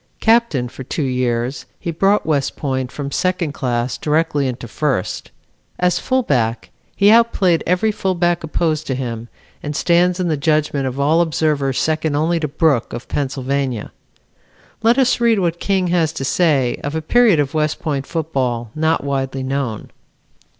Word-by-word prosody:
Captain 225 - +2
for 130 - -9
two 145 +4 -3
years 125 0 -1
he 170 - -3
brought 195 +5 +2
West 145 -4 0
Point 130 -3 -2
from 140 -1 -5
second 180 -1 0
class 125 -3 -2
directly 150 -2 +1
into 125 -1 -5
first. 130 -5 -2 0.5
As 180 0 +1
fullback 130 - 0 0.2
he 200 +1 +5
outplayed 220 -7 +3
every 180 +5 +2
fullback 175 -4 0
opposed 155 -1 -1
to 130 - -1
him 120 -3 -5 0.3
and 150 0 -5
stands 175 +3 +2
in 180 - 0
the 160 - +1
judgment 150 -2 0
of 130 +1 -5
all 155 +4 +3
observers 150 -5 0
second 155 -1 0
only 165 +3 +1
to 155 - -1
Brooke 145 -4 +1
of 120 - -7
Pennsylvania. 135 -4 -2 0.9
Let 230 +3 +4
us 255 -2 +3
read 230 -2 +4
what 170 -3 0
King 190 -3 0
has 170 -3 +2
to 135 - -4
say 140 -5 +1
of 145 +2 -3
a 160 - -1
period 230 -3 +4
of 145 -1 0
West 155 -1 0
Point 140 -4 -3
football 130 -8 -2
not 160 0 0
widely 135 -1 -2
known. 130 -5 -3
150 Hz, 160 wpm, -19 LUFS, 135-175 Hz, 0.9 s, he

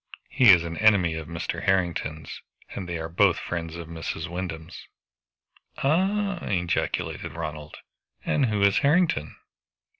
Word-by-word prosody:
He 125 -4 +5
is 90 -4 +8
an 85 -1 -5
enemy 100 -6 +4
of 80 -1 -6
Mr. 85 0 -4
Harrington's, 85 -5 -1 0.3
and 90 -3 -6
they 85 - -2
are 80 0 -4
both 90 +2 +3
friends 85 -1 -5
of 85 -1 -7
Mrs. 80 -1 -5
Wyndham's." 85 -1 -6 1.0
"Ah!" 190 +6 +1
ejaculated 90 -5 -2
Ronald, 75 -2 -6 0.5
"and 135 -4 +2
who 105 -2 0
is 100 -1 +4
Harrington?" 150 - +2
85 Hz, 130 wpm, -25 LUFS, 80-105 Hz, 1.0 s, is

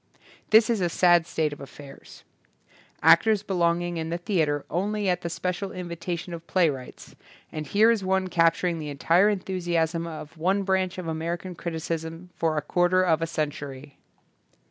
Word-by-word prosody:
This 220 +1 +6
is 230 -4 0
a 175 - +1
sad 175 -1 +4
state 155 -3 -1
of 145 - -11
affairs. 140 0 -12 0.8
Actors 210 +4 +5
belong 175 -3 +1
in 170 -2 -3
the 170 - -2
theatre 160 -6 0
only 205 +3 -1
at 180 -1 +1
the 170 - -4
special 180 +3 -3
invita 175 -1 -5
tion 175 +1 -8
of 170 0 -8
playwrights; 150 -9 -1 0.4
and 155 -1 -5
here 215 +8 +4
is 220 -4 0
one 190 0 +1
capturing 165 0 +2
the 150 -1 -5
entire 170 +8 +3
enthusiasm 175 -4 -1
of 160 0 -9
one 190 +4 +1
branch 190 -1 0
of 180 -2 -5
American 170 +3 -3
criticism 165 +1 -5
for 160 -2 0
a 150 - -1
quarter 175 +3 +2
of 165 -3 +2
a 165 - 0
century. 145 -3 -5
170 Hz, 165 wpm, -26 LUFS, 160-185 Hz, 0.8 s, This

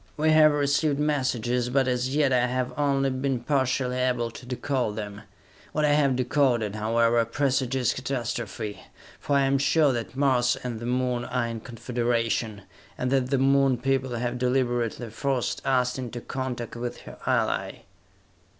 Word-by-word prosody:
We 155 +1 +3
have 155 -1 +7
received 145 0 +1
messages, 125 -5 0
but 130 +1 +2
as 125 +2 0
yet 145 -3 +3
I 125 -1 +3
have 125 0 -2
only 140 -2 +1
been 130 0 -1
partially 130 -1 0
able 125 -2 0
to 125 +2 -11
decode 125 -3 -1
them! 105 -1 -6 0.5
What 155 0 +1
I 145 - +3
have 140 -3 +3
decoded, 125 -4 +1
however, 115 +2 +2
presages 130 0 0
catastrophe 120 -5 -4 0.4
for 145 - -1
I 140 - +4
am 135 0 +2
sure 145 0 +3
that 120 +1 -4
Mars 130 -3 +2
and 120 -3 -4
the 120 - -5
Moon 125 -1 0
are 125 -1 -1
in 115 -1 -4
confederation, 115 -3 -2 0.3
and 125 0 -1
that 130 -2 +1
the 135 - +2
Moon 135 -1 +3
people 130 0 -1
have 120 +1 -2
deliberately 120 -2 0
forced 130 +1 -2
us 125 -1 +1
into 120 -1 -5
contact 125 -2 -5
with 120 +1 -5
her - - -12
ally!" - - 0
125 Hz, 160 wpm, -26 LUFS, 120-135 Hz, 0.5 s, have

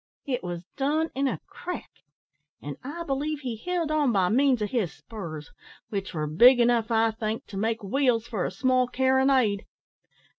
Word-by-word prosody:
It 260 -4 -2
was 175 -1 -5
done 305 +4 0
in 275 +2 0
a - - -2
crack; 360 -4 -7 0.7
an', 145 -1 -6
I 310 +6 -5
believe, 295 0 -2
he 250 -4 -3
held 335 +6 -2
on 300 -4 +2
by 190 -4 +2
means 255 -1 +3
of 210 - -3
his 220 -10 0
spurs, 165 -9 -8 0.4
which 200 -2 -3
were 155 -3 -2
big 240 - +6
enough, 235 -1 +3
I 225 -1 +3
think, 220 0 -4
to 195 - -8
make 225 +2 -1
wheels 235 +1 +1
for 215 -6 -3
a - - -1
small 255 +5 +2
carronade. 260 -4 +2
240 Hz, 175 wpm, -26 LUFS, 205-270 Hz, 0.7 s, big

